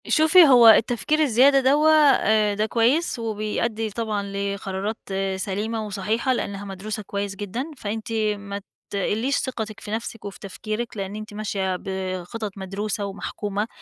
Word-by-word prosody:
شوفي، 320 +3 +6
هو 245 -5 +7
التفكير 240 +7 +4
الزيادة 275 -1 +5
دَوّة، 290 +4 +4
آآ، 220 -9 +4
ده 210 +1 +1
كويس 240 +7 +1
وبيأدّي 220 0 -2
طبعًا 215 -1 -2
لقرارات 200 +1 -3 0.4
سليمة 215 +3 -3
وصحيحة 215 +5 -1
لأنها 200 -4 -4
مدروسة 205 +2 -5
كويس 200 0 -4
جدًا، 225 - -5
فأنتِ 220 +1 -5 0.3
ما 200 0 -6 0.3
تقلّيش 220 +7 0
ثقتِك 220 -5 -4
في 205 - -8
نفسِك 225 0 -5
وفي 200 +3 -7
تفكيرِك، 215 +2 -5
لإن 195 0 -4
أنتِ 215 0 -8
ماشية 200 -3 -2
بِخطط 190 +2 -4
مدروسة 200 +2 -3
ومحكومة، 205 +1 -4
215 Hz, 135 wpm, -23 LUFS, 200-235 Hz, 0.4 s, هو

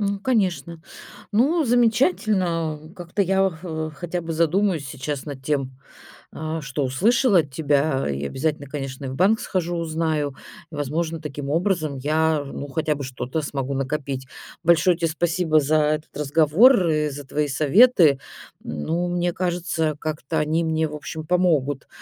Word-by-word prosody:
М, 200 -1 -1
конечно. 180 - 0 0.5
Ну, 300 +10 +3
замечательно, 215 - +1 0.2
как-то 175 +2 -5
я 195 +1 +2
х 160 -2 -5
хотя 175 +3 -4
бы 165 0 -5
задумаюсь 165 -1 +1
сейчас 140 +1 -5
над 140 -3 -8
тем, 135 -3 -1 0.6
а 160 0 -4
что 135 +1 -3
услышала 205 - +3
от 150 -4 -2
тебя, 140 - +1
и 70 +1 -3
обязательно, 145 - -2
конечно, 135 -1 -5
в 130 - -5
банк 200 +8 +3
схожу, 175 -2 -2
узнаю. 155 -4 -1 0.4
Возможно, 155 +3 -2
таким 145 -2 -6
образом 160 -4 0
я, 155 +2 +1
ну, 140 0 -7
хотя 150 +2 -1
бы 140 - -6
что-то 130 +3 -4
смогу 140 -1 -3
накопить. 135 -1 -3 0.4
Большое 170 +1 +4
тебе 165 -2 0
спасибо 165 -1 +2
за 150 +2 +1
этот 155 -1 0
разговор 165 - +4
и 150 -1 +1
за 145 +1 -7
твои 145 +2 -1
советы. 155 - +5 0.4
Ну, 165 - -2
мне 175 0 0
кажется, 175 -3 -1
как-то 155 0 -3
они 155 +2 +1
мне, 160 -1 0
в 150 - -7
общем, 155 +1 -6
помогут, 155 -6 +1
155 Hz, 145 wpm, -23 LUFS, 145-175 Hz, 0.6 s, советы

